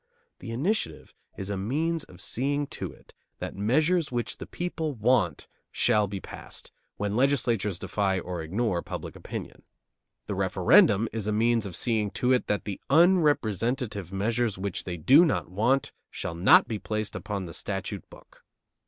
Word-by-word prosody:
The 115 Hz, -, -8 dB
initiative 125 Hz, -, -2 dB, 0.2 s
is 95 Hz, +1 st, -4 dB
a 100 Hz, -, -2 dB
means 155 Hz, -, -1 dB
of 90 Hz, 0 st, -14 dB
seeing 140 Hz, +6 st, -1 dB
to -, -, -5 dB
it -, -, -19 dB, 0.2 s
that -, -, -5 dB
measures 155 Hz, -, +2 dB
which 120 Hz, -1 st, -3 dB
the -, -, -8 dB
people 165 Hz, -4 st, -3 dB
want 110 Hz, -5 st, +1 dB, 0.3 s
shall 105 Hz, -3 st, +3 dB
be 100 Hz, 0 st, -5 dB
passed, -, -, -9 dB, 0.3 s
when 105 Hz, 0 st, -2 dB
legislatures 115 Hz, -7 st, +1 dB
defy 95 Hz, 0 st, 0 dB
or 90 Hz, -1 st, -5 dB
ignore 90 Hz, +2 st, -1 dB
public -, -, -7 dB
opinion. -, -, -7 dB, 0.6 s
The -, -, -3 dB
referendum 105 Hz, +3 st, +4 dB
is 110 Hz, -2 st, -3 dB
a -, -, +1 dB
means 115 Hz, 0 st, +2 dB
of 90 Hz, -, -6 dB
seeing 110 Hz, -4 st, +1 dB
to 125 Hz, +1 st, +3 dB
it 125 Hz, -, +1 dB
that 105 Hz, -, -1 dB
the 100 Hz, -2 st, -5 dB
unrepresentative 130 Hz, -, +2 dB
measures 110 Hz, +2 st, 0 dB
which 95 Hz, 0 st, -3 dB
they 90 Hz, -2 st, -4 dB
do 135 Hz, -, +6 dB
not 150 Hz, -, 0 dB
want 120 Hz, +8 st, +1 dB, 0.2 s
shall -, -, -5 dB
not 85 Hz, +4 st, +6 dB
be 110 Hz, -2 st, -3 dB
placed 110 Hz, 0 st, -3 dB
upon 100 Hz, -3 st, -4 dB
the 85 Hz, -, -8 dB
statute -, -, -4 dB
book. -, -, -18 dB
110 Hz, 160 wpm, -27 LUFS, 100-135 Hz, 0.6 s, do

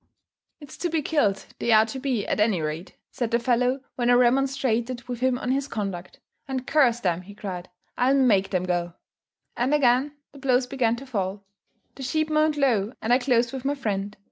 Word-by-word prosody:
"It's 290 Hz, -3 st, -12 dB
to 350 Hz, -, -2 dB
be 320 Hz, -2 st, -1 dB
killed, 215 Hz, -12 st, +1 dB
they 235 Hz, -, 0 dB
are 220 Hz, 0 st, +6 dB
to 245 Hz, +4 st, -6 dB
be, 255 Hz, -6 st, -1 dB
at -, -, -1 dB
any 210 Hz, -4 st, +3 dB
rate," 155 Hz, +3 st, -5 dB, 0.2 s
said 240 Hz, -3 st, -2 dB
the 235 Hz, -, +2 dB
fellow 250 Hz, +2 st, +1 dB, 0.2 s
when 240 Hz, -1 st, +1 dB
I -, -, +6 dB
remonstrated 250 Hz, -1 st, +1 dB
with 245 Hz, -2 st, -4 dB
him 255 Hz, 0 st, +1 dB
on 250 Hz, 0 st, -2 dB
his 275 Hz, +1 st, 0 dB
conduct; 195 Hz, -7 st, -5 dB, 0.3 s
"and, 260 Hz, -1 st, -3 dB
curse 250 Hz, -6 st, +3 dB
them," 180 Hz, -5 st, 0 dB
he 200 Hz, +2 st, -13 dB
cried, 185 Hz, -4 st, -6 dB, 0.3 s
"I'll 260 Hz, +2 st, +4 dB
make 220 Hz, -8 st, +3 dB
them 185 Hz, -2 st, 0 dB
go." 175 Hz, -1 st, -1 dB, 0.6 s
And 255 Hz, +5 st, +1 dB
again 270 Hz, +1 st, +2 dB, 0.2 s
the 280 Hz, -, -14 dB
blows 255 Hz, -2 st, +2 dB
began 250 Hz, -3 st, 0 dB
to 265 Hz, +3 st, -9 dB
fall. 200 Hz, -5 st, -3 dB, 0.5 s
The -, -, -11 dB
sheep 310 Hz, +4 st, -1 dB
moaned 305 Hz, 0 st, +2 dB
low, 235 Hz, -6 st, +1 dB
and 230 Hz, +2 st, +1 dB
I 250 Hz, -, +5 dB
closed 245 Hz, -2 st, +1 dB
with 265 Hz, -2 st, -5 dB
my 280 Hz, +1 st, 0 dB
friend. 205 Hz, -6 st, -3 dB
245 Hz, 200 wpm, -25 LUFS, 210-270 Hz, 0.6 s, are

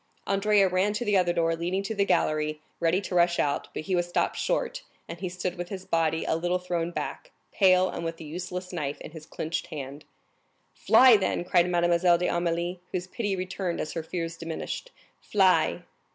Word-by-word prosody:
Andrea 200 Hz, 0 st, +3 dB
ran 185 Hz, +3 st, +1 dB
to 210 Hz, +3 st, -2 dB
the 205 Hz, -2 st, +2 dB
other 180 Hz, -2 st, +3 dB
door, 165 Hz, -1 st, +1 dB
leading 180 Hz, +4 st, -2 dB
to 200 Hz, -, -3 dB
the 200 Hz, -2 st, +1 dB
gallery, 155 Hz, -4 st, +1 dB, 0.2 s
ready 170 Hz, +3 st, +2 dB
to 190 Hz, -, -6 dB
rush 175 Hz, 0 st, +3 dB
out; 145 Hz, -1 st, 0 dB
but -, -, -5 dB
he 185 Hz, -, -3 dB
was 175 Hz, 0 st, 0 dB
stopped -, -, 0 dB
short, -, -, -1 dB, 0.3 s
and 170 Hz, -, -8 dB
he 185 Hz, -1 st, -3 dB
stood 180 Hz, 0 st, -4 dB
with 175 Hz, 0 st, -4 dB
his 190 Hz, -2 st, -6 dB
body 160 Hz, -1 st, 0 dB
a -, -, +1 dB
little 175 Hz, +2 st, 0 dB
thrown 175 Hz, -2 st, -2 dB
back, -, -, -5 dB, 0.2 s
pale, 185 Hz, -2 st, +4 dB
and 170 Hz, -, -5 dB
with 165 Hz, 0 st, -4 dB
the 160 Hz, -, -9 dB
useless 180 Hz, +3 st, -6 dB
knife 145 Hz, -4 st, -3 dB
in -, -, -8 dB
his 155 Hz, -1 st, -11 dB
clenched 160 Hz, +2 st, -4 dB
hand. 145 Hz, -2 st, -7 dB, 0.7 s
"Fly, 255 Hz, -3 st, +6 dB
then!" 190 Hz, -3 st, -1 dB
cried 175 Hz, 0 st, +3 dB
Mademoiselle 175 Hz, 0 st, +3 dB
d'Armilly, 175 Hz, 0 st, -1 dB
whose 180 Hz, -1 st, -2 dB
pity 205 Hz, +1 st, -2 dB
returned 185 Hz, -1 st, -3 dB
as 155 Hz, -, -3 dB
her 165 Hz, -, -2 dB
fears 165 Hz, 0 st, -4 dB
diminished; 165 Hz, -, -5 dB, 0.3 s
"fly!" 190 Hz, -3 st, +2 dB
175 Hz, 195 wpm, -27 LUFS, 165-185 Hz, 0.7 s, Fly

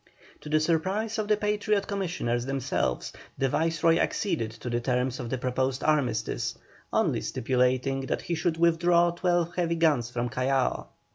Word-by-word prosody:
To 150 Hz, -, -9 dB
the 155 Hz, +1 st, +3 dB
surprise 190 Hz, +8 st, 0 dB
of 215 Hz, -, -1 dB
the 210 Hz, 0 st, +3 dB
Patriot 210 Hz, -1 st, 0 dB
Commissioners 170 Hz, -, -2 dB
themselves, 135 Hz, -, -1 dB, 0.2 s
the 135 Hz, -, +1 dB
Viceroy 165 Hz, +3 st, +2 dB
acceded 165 Hz, -, 0 dB
to 115 Hz, -, -9 dB
the 120 Hz, 0 st, 0 dB
terms 125 Hz, +1 st, -1 dB
of 120 Hz, -2 st, -5 dB
the 130 Hz, -, -1 dB
proposed 130 Hz, +1 st, -1 dB
armistice, 125 Hz, -8 st, 0 dB, 0.3 s
only -, -, +1 dB
stipulating 130 Hz, +2 st, 0 dB
that -, -, -2 dB
he 175 Hz, -, -3 dB
should 165 Hz, 0 st, 0 dB
withdraw 170 Hz, +1 st, +4 dB
twelve 175 Hz, -1 st, 0 dB
heavy 170 Hz, -2 st, 0 dB
guns 150 Hz, -8 st, +2 dB
from 120 Hz, 0 st, -2 dB
Callao. 130 Hz, +1 st, 0 dB
155 Hz, 155 wpm, -27 LUFS, 125-175 Hz, 0.3 s, withdraw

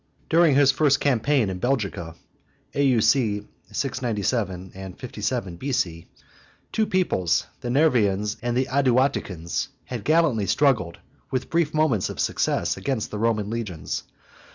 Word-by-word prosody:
During 165 Hz, -3 st, +5 dB
his 140 Hz, -1 st, +6 dB
first 140 Hz, 0 st, +3 dB
campaign 135 Hz, -2 st, +2 dB
in 90 Hz, -, -5 dB
Belgica, 100 Hz, -9 st, -2 dB, 0.6 s
(A. 140 Hz, -, +1 dB
U. 125 Hz, -5 st, +4 dB
C. 105 Hz, -6 st, +2 dB, 0.3 s
697 105 Hz, -6 st, -2 dB
and 95 Hz, -1 st, -9 dB
57 105 Hz, -6 st, -3 dB
B.C.), 85 Hz, -10 st, -2 dB, 0.6 s
two 220 Hz, -1 st, +1 dB
peoplets, 135 Hz, -, +1 dB
the 120 Hz, -, -5 dB
Nervians 110 Hz, -8 st, +2 dB
and 120 Hz, 0 st, -1 dB
the 130 Hz, -, +2 dB
Aduaticans, 130 Hz, -, 0 dB, 0.2 s
had 120 Hz, -5 st, -5 dB
gallantly 150 Hz, -10 st, +2 dB
struggled, 105 Hz, -, +2 dB, 0.3 s
with 130 Hz, -1 st, -3 dB
brief 165 Hz, -2 st, +2 dB
moments 145 Hz, -11 st, +2 dB
of -, -, -7 dB
success, -, -, 0 dB
against 130 Hz, -6 st, -2 dB
the 105 Hz, -, -4 dB
Roman 110 Hz, -2 st, 0 dB
legions. 105 Hz, -9 st, -4 dB
120 Hz, 130 wpm, -24 LUFS, 100-140 Hz, 0.6 s, his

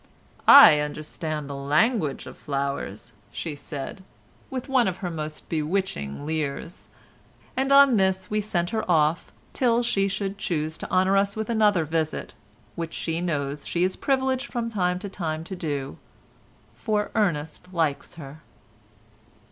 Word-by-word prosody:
"I 150 Hz, -, +10 dB
understand 150 Hz, 0 st, -4 dB
the 140 Hz, -, -6 dB
language 150 Hz, -, +1 dB
of -, -, -10 dB
flowers," 140 Hz, -6 st, -4 dB, 0.2 s
she 160 Hz, -3 st, -5 dB
said, 145 Hz, +5 st, -7 dB, 0.5 s
with 260 Hz, -1 st, -5 dB
one 260 Hz, -4 st, +3 dB
of 185 Hz, -1 st, -2 dB
her 175 Hz, -, -2 dB
most 155 Hz, -1 st, -6 dB
bewitching 155 Hz, -, -2 dB
leers, 155 Hz, +1 st, -4 dB, 0.7 s
and 270 Hz, +1 st, 0 dB
on 275 Hz, -4 st, +7 dB
this 190 Hz, -1 st, +1 dB
we 210 Hz, 0 st, 0 dB
sent 175 Hz, -4 st, -1 dB
her 220 Hz, -, -1 dB
off 160 Hz, -1 st, +2 dB, 0.2 s
till 240 Hz, -2 st, +2 dB
she 195 Hz, -5 st, +1 dB
should 195 Hz, 0 st, -3 dB
choose 160 Hz, -4 st, -2 dB
to -, -, -6 dB
honour 190 Hz, +1 st, +3 dB
us 200 Hz, 0 st, +1 dB
with 220 Hz, +1 st, -3 dB
another 210 Hz, -7 st, +3 dB
visit, 160 Hz, 0 st, -2 dB, 0.4 s
which 165 Hz, -1 st, -5 dB
she 165 Hz, 0 st, -2 dB
knows 145 Hz, -4 st, -2 dB
she 175 Hz, -, 0 dB
is 185 Hz, +1 st, +1 dB
privileged 265 Hz, -1 st, 0 dB
from 235 Hz, -2 st, -2 dB
time 180 Hz, -4 st, 0 dB
to 190 Hz, -, -6 dB
time 160 Hz, -5 st, -4 dB
to 190 Hz, +3 st, -6 dB
do, 145 Hz, -, -4 dB, 0.7 s
for 210 Hz, -, -1 dB
Ernest 175 Hz, -3 st, -1 dB
likes 160 Hz, -5 st, -1 dB
her. 150 Hz, -1 st, -10 dB
175 Hz, 150 wpm, -25 LUFS, 150-205 Hz, 0.7 s, I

